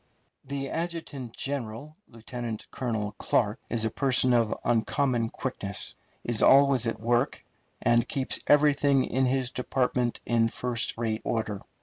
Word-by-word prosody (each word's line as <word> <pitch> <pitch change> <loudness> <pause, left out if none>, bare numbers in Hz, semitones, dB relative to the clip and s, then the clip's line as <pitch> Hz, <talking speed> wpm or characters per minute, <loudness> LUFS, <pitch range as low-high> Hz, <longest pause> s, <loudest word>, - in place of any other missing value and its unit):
The 135 0 -4
adjutant 160 -8 -5
general, 140 +1 -4
Lieutenant 115 -1 -6
Colonel 110 -5 -2
Clark, 105 -1 +1
is 115 -2 0
a 110 - -1
person 130 -1 +3
of 115 -3 +3
uncommon 120 +1 +1
quickness, 100 -7 -5 0.3
is 120 -3 0
always 135 -3 +5
at 115 - -2
work, 120 +4 0 0.4
and 120 +1 +3
keeps 135 -3 0
everything 145 -2 +4
in 130 0 +1
his 130 -1 0
department 125 -1 -1
in 115 -1 +2
first 120 0 -1
rate 110 -1 -2
order. 110 -3 -2
120 Hz, 130 wpm, -27 LUFS, 115-135 Hz, 0.4 s, always